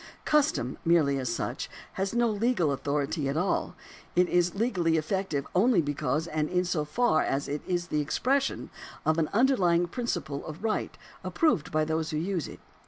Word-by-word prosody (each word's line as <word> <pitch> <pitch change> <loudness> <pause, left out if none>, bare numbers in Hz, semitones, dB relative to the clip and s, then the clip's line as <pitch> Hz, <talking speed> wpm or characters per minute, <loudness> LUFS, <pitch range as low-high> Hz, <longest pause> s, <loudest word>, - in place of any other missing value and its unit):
Custom, 275 - +1
merely 155 -5 +3
as 125 -3 -2
such, 115 - -3 0.2
has 195 0 -2
no 240 0 +3
legal 215 - +1
authority 140 +1 -1
at 140 - -1
all; 180 +4 0 0.4
it 180 0 +4
is 175 +1 +2
legally 185 -7 +1
effective 160 -3 -1
only 210 +2 +4
because 150 +1 -1
and 155 -2 -1
in 180 0 +1
so 170 -3 0
far 155 +4 +2
as 140 +1 -1
it 145 +1 -3
is 175 -1 -1
the 150 - +1
expression 270 - 0 0.3
of 155 +1 +2
an 155 - +1
underlying 195 -8 +3
principle 175 - -3
of 155 +5 -8
right 220 -1 -1 0.3
approved 315 - +1
by 155 0 +2
those 160 0 -1
who 155 - -2
use 175 0 -2
it. - - -10
170 Hz, 170 wpm, -28 LUFS, 150-200 Hz, 0.4 s, it